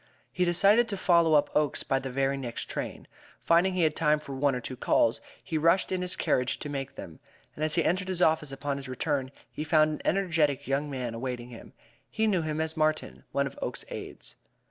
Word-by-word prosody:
He 180 - +1
decided 200 +7 +4
to 200 - -2
follow 170 -4 +4
up 145 - +2
Oakes 150 -2 +1
by 135 - +1
the 135 - -5
very 135 +1 0
next 125 -4 -5
train. - - -5 0.3
Finding 175 +3 +3
he 180 - +2
had 155 -1 +2
time 150 -1 +3
for 150 -2 -8
one 135 0 +1
or - - -2
two 130 +1 -6
calls, - - +2 0.2
he 160 - -2
rushed 170 +5 +3
in 185 -1 -1
his 180 0 -2
carriage 130 +1 +1
to 145 - -6
make 135 -1 -5
them, 80 - -9 0.3
and 155 - -5
as 155 0 +1
he 170 - +3
entered 185 +2 +1
his 185 -2 -2
office 160 -4 +2
upon 140 +1 -3
his 135 -1 -8
return 135 +1 -1 0.2
he 150 - -4
found 155 -1 +3
an - - -6
energetic 160 -7 +1
young 140 +2 0
man 125 -4 -4
awaiting 120 0 -5
him. 115 - -12 0.4
He 220 - 0
knew 195 -5 +2
him 155 -1 -3
as 160 0 -1
Martin, 155 -1 -1
one 140 - +1
of 135 - -7
Oakes's - - -4
aides. - - -8
150 Hz, 220 wpm, -28 LUFS, 135-170 Hz, 0.4 s, decided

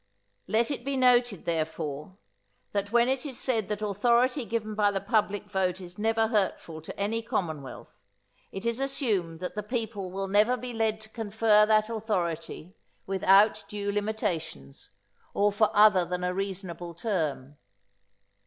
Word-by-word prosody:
Let 230 +4 +1
it 260 -4 -4
be 275 +1 -2
noted, 245 -5 +3
therefore, 155 0 -3 0.5
that 200 0 -2
when 235 +1 +4
it 265 0 0
is 275 -5 -6
said 225 -6 0
that 210 0 -3
authority 235 +6 +2
given 220 -1 -3
by 210 -1 +3
the 200 -1 -1
public 205 0 0
vote 190 -2 -1
is 180 +1 -10
never 225 +1 +1
hurtful 190 -7 -1
to 160 - -9
any 215 +3 -1
commonwealth, 160 - -4 0.6
it 195 +3 -7
is 235 +1 0
assumed 210 - -1
that 180 - -4
the 210 - -3
people 210 -3 -4
will 195 +1 -3
never 210 +6 +3
be 250 0 -6
led 220 -1 0
to 220 - -11
confer 215 -1 +3
that 215 0 +3
authority 185 -6 -3 0.3
without 195 +2 +4
due 205 -1 -3
limitations, 185 - -3 0.5
or 205 0 +3
for 210 +1 +3
other 210 -3 +6
than 180 +1 -4
a 180 0 0
reasonable 180 -3 -5
term. 155 - -3
205 Hz, 155 wpm, -28 LUFS, 185-225 Hz, 0.6 s, other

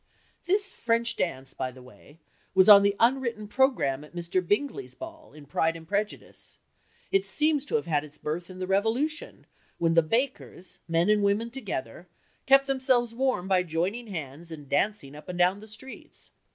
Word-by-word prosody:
This 400 +3 +1
French 230 0 0
dance, 135 -6 -3
by 130 -1 -3
the 130 0 -13
way, 140 +4 -17 0.4
was 190 0 +6
on 205 -1 +11
the 200 0 +2
unwritten 235 -3 +1
programme 210 - +1
at 150 - -15
Mr. 175 +2 -1
Bingley's 280 - -2
ball, 325 -2 -10
in 150 -1 -13
Pride 160 +3 0
and 165 -1 -11
Prejudice. 205 +3 -4 0.5
It 390 0 +3
seems 300 -5 +1
to 265 - -2
have 225 - +1
had 150 -4 +1
its 150 0 -13
birth 170 +4 -4
in 185 - -10
the 185 - -3
Revolution, 225 - -1 0.3
when 165 -1 +2
the 165 - +6
bakers, 230 - -2
men 165 +1 +2
and 210 -1 +3
women 205 +4 +1
together, 180 - -6 0.4
kept 275 0 +6
themselves 260 -3 +1
warm 250 -7 0
by 190 -1 +3
joining 180 +8 -2
hands 165 -3 -7
and 150 -3 -9
dancing 145 -2 0
up 150 +5 -12
and 180 - -4
down 180 +3 +3
the 215 - -12
streets. 260 +5 -11
200 Hz, 180 wpm, -27 LUFS, 165-250 Hz, 0.5 s, on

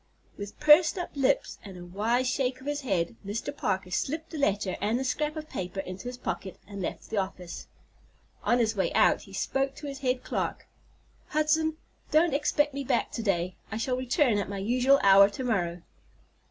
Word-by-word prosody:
With 200 0 -8
pursed 305 +4 +6
up 355 - -4
lips 270 -2 +1
and 195 -3 -9
a 175 - -9
wise 225 +8 0
shake 255 0 0
of 260 - -14
his 290 0 -2
head, 195 -6 -1
Mr. 225 +8 -4
Parker 190 -7 -2
slipped 315 - -2
the 315 - -5
letter 200 -7 +1
and 220 +3 +1
the - - -1
scrap 300 +4 -1
of 310 -1 -6
paper 185 - -5
into 185 +4 -7
his 245 0 -5
pocket, 190 -6 -4
and 200 -1 -7
left 180 - -5
the 220 - -1
office. 185 -3 -4 0.7
On 240 - +2
his 225 -2 +1
way 190 - 0
out - - +4
he - - -14
spoke 270 0 -1
to 300 - -9
his 275 -1 -5
head 255 -2 0
clerk: - - -3 0.6
"Hudson, 310 +1 +1 0.3
don't 315 0 +4
expect 295 0 +1
me 280 0 -3
back - - 0
to 230 - -4
day. 185 -4 0 0.2
I 220 - -2
shall 250 +3 0
return 255 -3 +2
at 200 - -3
my 200 - -4
usual 250 +7 +3
hour 195 0 +8
to 205 +6 -6
morrow." 175 -8 -1
245 Hz, 195 wpm, -28 LUFS, 195-285 Hz, 0.7 s, hour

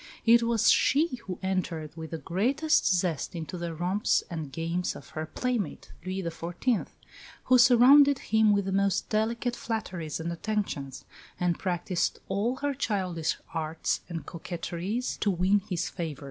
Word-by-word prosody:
It 235 0 +7
was 230 -2 +3
she 290 0 +3
who 180 - -4
entered 175 -5 -2
with 160 -1 -7
the 165 - -4
greatest 265 - +1
zest 175 -3 0
into 165 +2 -5
the 170 -2 -4
romps 180 +6 +1
and 160 -4 -5
games 165 +4 -2
of - - -11
her 155 0 -5
playmate, 235 - -3
Louis 185 +1 -3
XIV., 175 +7 -1 0.6
who 255 0 +5
surrounded 265 +3 +7
him 220 -2 +3
with 200 -1 +2
the 195 - -2
most 195 -1 +1
delicate 230 +3 0
flatteries 180 -9 -4
and 170 +1 -3
attentions, 170 - -3 0.3
and 175 -2 0
practised 180 -1 -1
all 205 +6 0
her 285 +2 -2
childish 185 - -1 0.2
arts 160 0 -1
and 165 -2 -5
coquetries 175 +7 -4
to 210 - +1
win 190 +2 +3
his 180 -1 -1
favour. 160 -5 -5
185 Hz, 150 wpm, -28 LUFS, 170-225 Hz, 0.6 s, It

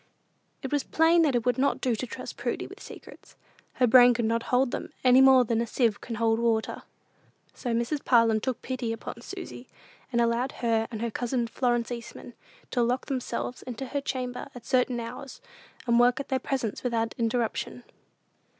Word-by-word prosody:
It 265 - -4
was 290 -1 +1
plain 330 +1 +3
that 295 -5 +2
it 240 -1 0
would 250 +1 +1
not 280 +1 +2
do 255 -3 0
to 255 - -4
trust - - -7
Prudy - - -3
with - - -12
secrets. - - -13 0.4
Her 255 - +2
brain 245 0 +7
could 235 -1 0
not 230 +1 +1
hold 250 0 +2
them, - - -5
any 255 0 +6
more 265 -2 +7
than 230 0 0
a 235 - -2
sieve 225 -2 0
can 235 - -5
hold 225 0 +1
water. 230 -2 0 0.7
So 245 - -4
Mrs. 235 +5 -1
Parlin 230 -3 +4
took 255 -1 -3
pity 255 -3 -3
upon 225 - -8
Susy, - - -8 0.4
and 235 - +1
allowed 235 +2 +1
her 225 -2 0
and 225 -2 -5
her 235 - -2
cousin 245 +1 -1
Florence 240 0 -1
Eastman 240 0 -8 0.4
to 245 - +1
lock 245 +2 0
themselves 255 -2 -4
into 255 +1 -6
her 285 - -2
chamber 250 -2 -4
at 245 - -10
certain 250 -2 +1
hours, 240 +3 -8 0.5
and 235 0 +3
work 245 +2 +4
at 280 - -6
their 265 - +1
presents 250 -7 -3
without 230 -2 -1
interruption. 235 +1 -1
245 Hz, 185 wpm, -27 LUFS, 230-255 Hz, 0.7 s, brain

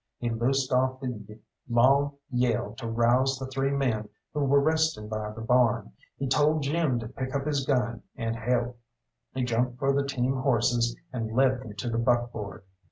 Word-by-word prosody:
He 120 -1 -2
loosed 130 +3 0
off 130 +1 +2
the 105 -5 -6 0.3
long 135 +4 +4 0.2
yell 120 -4 0
to 115 -3 -4
rouse 120 +4 +3
the 130 - -5
three 135 +1 -1
men 125 -7 0 0.2
who 150 - -2
were 140 +1 +5
resting 155 -7 +1
by 110 0 -3
the 110 +1 -8
barn, 120 - +2 0.3
he 135 - -2
told 150 +3 +3
Jim 145 -2 +1
to 115 -2 -4
pick 130 +3 -5
up 140 0 -1
his 145 -3 -1
gun 125 -4 0
and 115 -2 -2
help, 120 +1 -1 0.6
he 130 - 0
jumped 125 +1 0
for 135 +1 +1
the 140 0 +2
team 130 -1 0
horses 120 -2 +2 0.2
and 115 -3 -3
led 130 0 +3
them 110 -5 -9
to 105 - -5
the 115 - 0
buckboard. 120 -5 -1
125 Hz, 180 wpm, -27 LUFS, 115-135 Hz, 0.6 s, were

